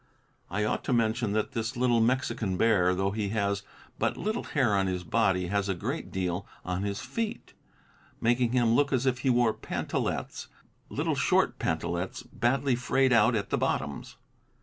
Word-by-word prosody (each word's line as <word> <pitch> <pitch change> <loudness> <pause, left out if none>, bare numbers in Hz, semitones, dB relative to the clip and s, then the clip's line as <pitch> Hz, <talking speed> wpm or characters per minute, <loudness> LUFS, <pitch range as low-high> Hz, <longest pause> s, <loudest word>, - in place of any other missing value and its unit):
I 105 +4 -1
ought 105 - -1
to - - 0
mention 115 -2 +1
that 110 0 0
this 115 +2 -3
little 120 -2 +3
Mexican 115 -5 0
bear, 90 -5 +3
though 95 +1 0
he 105 -1 -2
has 100 -2 0 0.4
but - - 0
little 215 +3 -2
hair 130 -8 +1
on 95 -1 +2
his 90 -1 -2
body, 95 -1 +1
has 100 0 0
a 95 - 0
great 85 - -4
deal 90 0 -2 0.2
on 90 0 -2
his 100 0 -2
feet, 225 -2 -4 0.7
making 120 +1 +2
him 120 -3 +3
look 140 +3 +3
as 130 -1 +1
if 125 -1 +1
he 130 - 0
wore 120 -3 +3
pantalets, - - -3 0.4
little - - -1
short - - +2
pantalets 85 +3 -2
badly 130 +2 0
frayed 130 +1 +2
out 115 +1 +5
at 100 -2 -2
the - - +1
bottoms. 70 -1 -2
110 Hz, 170 wpm, -28 LUFS, 95-125 Hz, 0.7 s, out